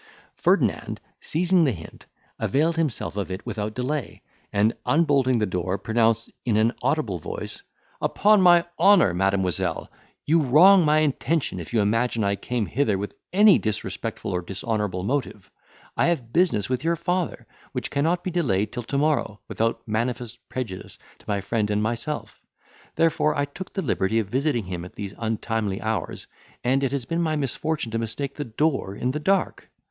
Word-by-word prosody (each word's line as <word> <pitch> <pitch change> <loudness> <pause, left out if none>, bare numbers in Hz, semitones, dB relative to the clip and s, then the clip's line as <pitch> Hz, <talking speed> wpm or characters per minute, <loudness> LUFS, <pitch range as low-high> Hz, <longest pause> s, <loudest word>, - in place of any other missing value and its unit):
Ferdinand, - - +1 0.2
seizing 175 +2 +2
the 140 - +3
hint, 80 -7 -10 0.3
availed 155 +5 +1
himself 155 -11 -2
of 100 -2 -3
it 95 +2 -6
without 110 -2 -4
delay, 135 +2 -3 0.3
and, 105 +3 +2
unbolting 140 -5 +3
the 110 - +1
door, 90 0 -2
pronounced 115 +1 +1
in 115 -4 +1
an 110 +2 +3
audible 120 - 0
voice, - - -6 0.4
"Upon 210 -1 +4
my 175 -2 +6
honour, 195 - +6
Mademoiselle, 95 -2 0 0.3
you 160 +2 +4
wrong 175 +8 +7
my 155 0 +4
intention, 150 - 0
if 85 - -8
you 115 -3 +2
imagine 115 +2 +1
I 100 0 +1
came 120 +2 -2
hither 110 -3 0
with 100 +2 -5 0.2
any 205 +1 +6
disrespectful 110 -1 -3
or 90 - -1
dishonourable 100 0 -3
motive. 125 -4 -3 0.4
I - - +2
have 130 -9 -1
business 165 - +2
with 130 +1 -2
your 170 +1 +2
father, 175 +1 -2 0.3
which - - -4
cannot 165 +5 +1
be 185 - -3
delayed 110 - 0
till 120 - -3
to 140 +4 -3
morrow, 145 -8 0
without 115 +1 -2
manifest 120 +2 -3
prejudice 115 -8 -6 0.2
to - - -21
my 100 -1 0
friend 105 +1 -1
and 105 0 +1
myself; 120 +7 -3 0.5
therefore 155 -2 +2
I 145 - +1
took 175 +6 -9
the 195 - -2
liberty 110 -5 0
of 110 -4 0
visiting 130 -3 0
him 90 -2 -5
at 90 - -11
these 100 -1 -6
untimely 110 -2 -2
hours, 110 -1 -3 0.4
and 130 +3 +2
it 135 - +1
has 140 -4 -2
been 165 +6 -1
my 160 -2 0
misfortune 150 -2 -2
to 115 - -1
mistake 115 +5 -3
the 145 - -5
door 125 -4 -1
in 125 - -1
the 150 - -3
dark. 195 +5 0
120 Hz, 170 wpm, -24 LUFS, 105-155 Hz, 0.5 s, wrong